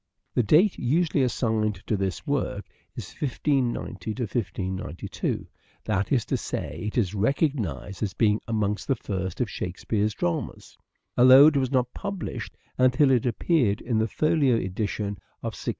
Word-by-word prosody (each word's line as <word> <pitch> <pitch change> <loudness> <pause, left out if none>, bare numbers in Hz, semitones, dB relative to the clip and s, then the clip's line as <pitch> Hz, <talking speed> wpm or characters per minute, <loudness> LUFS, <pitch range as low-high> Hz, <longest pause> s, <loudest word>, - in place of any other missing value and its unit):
The - - +3
date 160 - +4
usually 150 +3 +1
assigned 110 -4 0
to 110 - 0
this 95 -4 -3
work 130 -8 -1 0.3
is - - -7
1590 120 - -2
92; 95 -3 -4 0.4
that 95 0 -1
is 125 -5 +2
to - - -1
say - - -5
it 105 - -4
is 100 -5 +1
recognized 105 - -1
as 100 -5 -2
being 105 -1 +2
amongst 105 -2 -1
the 135 - +2
first 95 -3 -4
of 125 - +1
Shakespeare's 105 +3 -2
dramas, 85 -1 -3 0.4
although 130 +3 +9
it 155 -2 +5
was 130 -2 +1
not 125 -2 0
published 200 -4 -5 0.2
until 130 +2 +4
it 125 -1 +2
appeared 120 - +1
in 115 -2 -1
the 110 - +1
Folio 150 -2 +2
edition 100 0 -2 0.2
of - - -3
1623. - - -5
115 Hz, 150 wpm, -26 LUFS, 100-135 Hz, 0.4 s, although